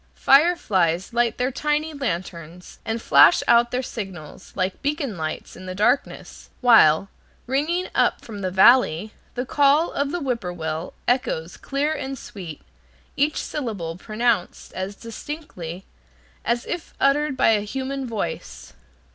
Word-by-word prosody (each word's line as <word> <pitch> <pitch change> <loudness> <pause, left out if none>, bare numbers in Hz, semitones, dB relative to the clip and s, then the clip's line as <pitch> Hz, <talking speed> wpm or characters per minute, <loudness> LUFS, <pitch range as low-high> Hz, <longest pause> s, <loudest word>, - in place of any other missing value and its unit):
Fireflies 215 - +3
light 235 -1 +1
their 250 +2 0
tiny 300 +3 -1
lanterns 175 - -5
and 225 +1 -2
flash - - +6
out 235 0 +5
their 250 +1 -2
signals, 190 -8 -8
like 185 0 -2
beacon 285 - -2
lights 155 -2 -5
in 185 +1 -10
the 185 - -5
darkness, 210 +8 -1
while, 195 -8 +5 0.4
ringing 310 +8 0
up - - +1
from 210 -3 -8
the 185 - -1
valley, 205 -1 +4 0.2
the 250 - -2
call 290 +4 +3
of 280 0 -1
the 350 +4 -2
whip 255 -6 -2
poor 180 -2 -4
will 160 0 -5
echoes 180 -10 0
clear 285 +3 -1
and 270 -3 -5
sweet, 175 -10 -9 0.5
each 295 +2 +1
syllable 205 - -4
pronounced 215 -1 -1
as 190 +2 -4
distinctly 220 - -8 0.6
as 235 +1 -1
if 345 -1 -6
uttered 280 0 +2
by - - +4
a 215 -2 +3
human 265 +5 -4
voice. 220 -4 -5
235 Hz, 140 wpm, -23 LUFS, 185-275 Hz, 0.6 s, flash